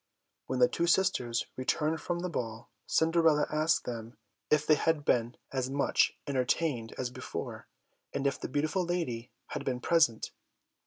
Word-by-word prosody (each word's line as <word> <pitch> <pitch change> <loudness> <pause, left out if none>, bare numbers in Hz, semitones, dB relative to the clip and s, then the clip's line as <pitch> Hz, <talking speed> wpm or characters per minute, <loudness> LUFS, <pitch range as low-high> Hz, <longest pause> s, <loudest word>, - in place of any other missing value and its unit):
When 130 - -1
the 125 0 +6
two 170 - -1
sisters 125 -10 +2
returned 150 +5 0
from 175 -1 -2
the 180 - -1
ball, 115 -6 -5 0.2
Cinderella 160 -2 +4
asked 155 +1 +2
them 115 0 -6 0.3
if 150 0 +3
they 155 - +6
had 155 -1 +1
been 120 0 +1 0.2
as 130 -1 -1
much 140 +1 +2
entertained 130 -2 0
as 125 -1 -2
before, - - -6 0.4
and 140 - -3
if 140 - +1
the - - -4
beautiful 155 +7 0
lady 165 -10 -2 0.2
had 145 - -4
been 130 -2 -1
present. 145 -6 +2
140 Hz, 155 wpm, -31 LUFS, 125-160 Hz, 0.4 s, the